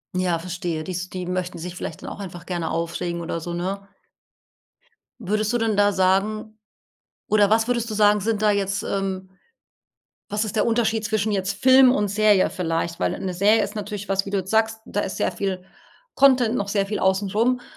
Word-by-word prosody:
Ja 180 -2 +1
verstehe 170 -2 -4
dies 180 +1 -4
die 185 -1 -5
möchten 180 0 -3
sich 175 +2 -6
vielleicht 165 - -6
dann - - -7
auch - - -9
einfach 175 -3 -8
gerne 175 -3 -3
aufregen 170 +1 -3
oder 170 0 -3
so, 175 +2 -5
ne? 195 +3 -4 1.3
Würdest 215 0 -1
du - - +3
denn 225 -2 0
da 205 0 +4
sagen 210 +3 0 0.7
oder 210 -1 +4
was 220 +1 +3
würdest 235 -2 0
du - - -3
sagen 210 0 +4
sind 215 +1 -1
da 210 - +4
jetzt, 200 -1 0
ähm 190 -1 -3 1.0
Was 210 +1 0
ist 215 - -4
der - - +3
Unterschied 225 -2 +1
zwischen 215 0 0
jetzt 195 0 -1
Film 260 0 +7
und 205 -5 0
Serie 210 -1 +3
vielleicht, 165 -1 -2
weil - - 0
'ne 185 -1 -4
Serie 205 +4 +3
ist 200 +2 -5
natürlich 205 -1 -5
was 195 0 +1
wie - - -5
du 200 0 0
jetzt 190 +1 -6
sagst, 220 0 +2
da 205 - -3
ist 190 - -3
sehr - - 0
viel 190 -2 -3 0.5
Content 255 -4 +4
noch 200 -5 -1
sehr 200 -1 0
viel 210 +1 -3
außen 190 +1 +1
rum. 245 +4 +1
200 Hz, 200 wpm, -23 LUFS, 185-215 Hz, 1.3 s, Film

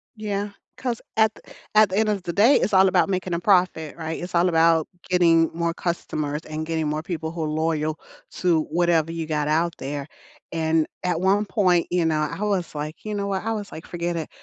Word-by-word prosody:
Yeah, 205 -1 -3 0.3
'cause 245 -3 -3 0.2
at 220 -1 +5
th - - -16 0.2
at 215 -1 +6
the 190 - -2
end 215 0 +2
of 200 -3 -1
the 170 - -4
day, 225 +9 +5
it's 210 - +1
all 190 0 +6
about 185 - +3
making 185 -2 -2
a 170 - 0
profit, 180 -5 +2
right, 160 -1 -4
it's 175 0 -5
all 175 +1 +4
about 165 -1 +3 0.2
getting 165 -2 +4
more 170 0 -1
customers, 155 -4 -3
and 155 0 -4
getting 160 -1 -1
more 155 +1 -2
people 160 -2 -4
who 165 -1 -4
are 155 - -1
loyal 155 0 -1 0.3
to 170 -3 +2
whatever 165 -1 +1
you 165 -1 -3
got 150 -2 -1
out 165 +3 +1
there, 140 +1 -5 0.4
and 160 -1 +1 0.2
at 175 -2 0
one 200 +3 +3
point, 185 -4 +2
you 175 -1 +2
know, 155 -1 +1
I 150 +6 -3
was 195 -5 -1
like, 150 +5 -6
"You 210 -1 -3
know 200 -1 -2
what," 195 -1 -2
I 225 - 0
was 210 -2 -5
like, 160 - -9
"Forget 175 0 -3
it, 160 - -4
170 Hz, 220 wpm, -24 LUFS, 160-190 Hz, 0.4 s, at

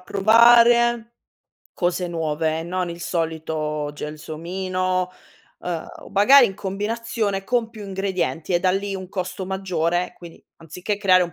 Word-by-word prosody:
provare 235 +3 +5 0.6
cose 180 0 -1
nuove, 160 -1 -1
non 180 +1 -3
il 170 0 -7
solito 160 -3 -3
gelsomino, 180 +5 -3 0.5
ehm 170 -3 -4
o - - -12
magari 240 +6 +7
in 195 - -6
combinazione 205 0 -3
con 240 +1 0
più 215 -3 -10
ingredienti 190 -3 -2
e - - +4
da 185 - +3
lì 195 +1 -2
un 185 -1 -7
costo 185 0 -4
maggiore. 180 -2 -1
Quindi, 170 -2 -13
anziché 180 +5 -4
creare 185 -3 +4
un 170 - -8
185 Hz, 135 wpm, -22 LUFS, 170-205 Hz, 0.6 s, magari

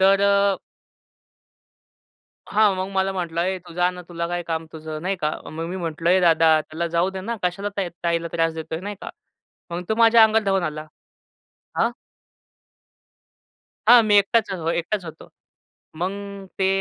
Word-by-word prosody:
तर 195 +1 +5
अ 200 -1 +3 1.9
हां, 210 -2 +4
मग 185 +1 -3
मला 190 0 +1
म्हंटला, 170 -2 -2
"ए, 190 0 -1
तू 175 -1 -14
जा 180 0 +2
ना, 180 0 -9
तुला 170 -1 -4
काय 175 0 -2
काम 165 -1 -3
तुझं?" 155 -1 -7
नाही 190 +1 -1
का. 150 -3 -1 0.2
मग 165 +1 -5
मी 185 - -4
म्हटलं, 165 -1 -1
"ए 185 0 +5
दादा, 160 -2 +5
त्याला 160 +2 -4
जाऊ 180 +3 +2
दे 190 0 -6
ना. 230 +4 -4
कशाला 195 +3 -1
त्या 190 -3 -1 0.2
ताईला 170 0 0
त्रास 165 -1 +1
देतोय?" 160 +1 -5
नाही 205 +2 -5
का. - - -6 0.6
मग 175 +1 -3
तो 220 - +1
माझ्या 230 0 +6
अंगावर 220 0 +2
धावून 195 -2 +1
आला. 155 -1 -4 0.9
हां. 230 +1 +2 2.0
हां. 240 -1 +9
मी 205 -1 +4
एकटाच 220 +3 +2
अ, 190 - -2
एकटाच 175 +3 -2
होतो. 160 -1 -10 0.7
मग 180 +4 -1 0.5
ते 190 - +2
180 Hz, 170 wpm, -23 LUFS, 165-195 Hz, 2.0 s, हां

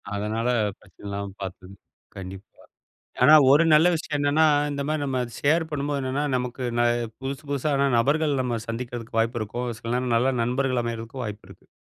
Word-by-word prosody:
அதனால, 110 +3 -2 0.3
பிரச்சனை 100 0 -18
இல்லாம, 100 0 -4
பாத்து 95 0 -7 0.5
கண்டிப்பா. 95 +1 -8 0.8
ஆனா, 150 +5 +8 0.2
ஒரு 160 +4 +5
நல்ல 155 +3 +6
விஷயம் 150 -1 -3
என்னன்னா, 145 +2 +3 0.3
இந்த 140 - -3
மாதிரி, 155 -1 -1
நம்ம 130 -2 -1 0.2
ஷேர் 160 +3 +2
பண்ணும்போது 145 -1 -2
என்னன்னா, 135 +3 -1
நமக்கு 125 +1 -4 0.2
ந - - +5 0.4
புதுசு 135 +2 -5
புதுசான 140 0 +1
நபர்கள், 145 +4 +2
நம்ம 120 -2 -2
சந்திக்கிறதுக்கு 115 -1 -5
வாய்ப்பு 115 +1 -1
இருக்கும். 120 +4 -4
சில 115 - -4
நேரம் 125 -2 0
நல்ல 130 +3 +2
நண்பர்கள் 125 0 0
அமையறதுக்கும், 115 +2 -5
வாய்ப்பு 105 -1 -7
இருக்கு. - - -17
125 Hz, 165 wpm, -25 LUFS, 115-140 Hz, 0.8 s, ஆனா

